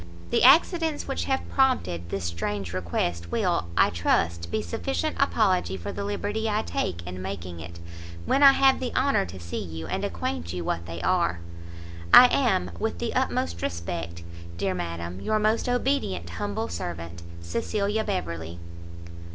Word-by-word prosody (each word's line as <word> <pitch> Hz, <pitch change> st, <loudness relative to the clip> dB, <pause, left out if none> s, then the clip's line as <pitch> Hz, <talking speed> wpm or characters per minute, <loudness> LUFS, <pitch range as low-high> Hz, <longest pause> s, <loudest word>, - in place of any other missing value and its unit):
The -, -, +3 dB
accidents 320 Hz, +3 st, +5 dB
which 270 Hz, -, -2 dB
have 265 Hz, 0 st, -1 dB
prompted 90 Hz, -, +1 dB
this 100 Hz, +1 st, -3 dB
strange 90 Hz, +2 st, -3 dB
request 85 Hz, -1 st, -2 dB
will, -, -, +1 dB
I -, -, +5 dB
trust, 85 Hz, 0 st, 0 dB
be 105 Hz, +4 st, -1 dB
sufficient 85 Hz, 0 st, -2 dB
apology 90 Hz, +2 st, +2 dB
for 85 Hz, -, -5 dB
the -, -, -4 dB
liberty 205 Hz, +2 st, -2 dB
I 215 Hz, +1 st, 0 dB
take 85 Hz, -1 st, -3 dB
in 90 Hz, +1 st, -6 dB
making 90 Hz, -2 st, -6 dB
it, 85 Hz, +1 st, -9 dB, 0.5 s
when 275 Hz, -, +2 dB
I 275 Hz, -1 st, +9 dB
have 270 Hz, 0 st, +4 dB
the 255 Hz, -2 st, -3 dB
honour 260 Hz, -7 st, +2 dB
to 95 Hz, -, -9 dB
see 85 Hz, 0 st, -5 dB
you, 80 Hz, -2 st, -6 dB
and -, -, -3 dB
acquaint 85 Hz, -1 st, -3 dB
you 90 Hz, -1 st, -3 dB
what 85 Hz, 0 st, -2 dB
they 85 Hz, +1 st, -6 dB
are. 85 Hz, 0 st, +2 dB, 0.7 s
I 250 Hz, -, +11 dB
am, 205 Hz, -, +2 dB
with 85 Hz, -, -1 dB
the -, -, -3 dB
utmost 85 Hz, 0 st, -1 dB
respect, 85 Hz, 0 st, -4 dB, 0.3 s
Dear 95 Hz, +1 st, 0 dB
Madam, 85 Hz, +1 st, -5 dB
your 215 Hz, -, +1 dB
most 215 Hz, +3 st, +1 dB
obedient 245 Hz, -, 0 dB
humble 100 Hz, +5 st, -3 dB
servant, 85 Hz, 0 st, -6 dB, 0.2 s
CECILIA 200 Hz, -, -1 dB
BEVERLEY. 85 Hz, -, -4 dB
90 Hz, 160 wpm, -26 LUFS, -, 0.7 s, I